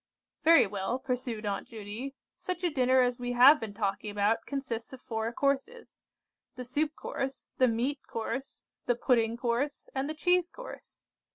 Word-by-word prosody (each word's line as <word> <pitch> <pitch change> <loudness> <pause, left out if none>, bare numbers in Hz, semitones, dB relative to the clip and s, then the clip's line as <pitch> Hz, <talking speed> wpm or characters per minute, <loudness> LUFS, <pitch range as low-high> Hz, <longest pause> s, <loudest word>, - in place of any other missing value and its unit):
"Very 330 +1 +7
well," 200 +4 -2
pursued 250 -4 -3
Aunt 200 -1 -2
Judy, 225 +5 -7 0.2
"such 365 -1 -3
a 350 - +2
dinner 260 -2 +4
as 245 -1 +1
we 245 0 -2
have 270 +5 +8
been 210 -2 -6
talking 200 0 -2
about 205 +2 +1
consists 260 -5 -4
of 260 - -8
four 225 -2 -3
courses. 280 - -2 0.5
The 250 - -6
soup 295 +5 -1
course, 270 0 -5
the 255 - +6
meat 250 +5 0
course, 265 +4 -5 0.2
the 245 - +3
pudding 230 -2 +2
course, 250 +5 -1
and 270 +2 -1
the 310 - -3
cheese 355 +3 +2
course. - - -11
250 Hz, 165 wpm, -30 LUFS, 225-280 Hz, 0.5 s, have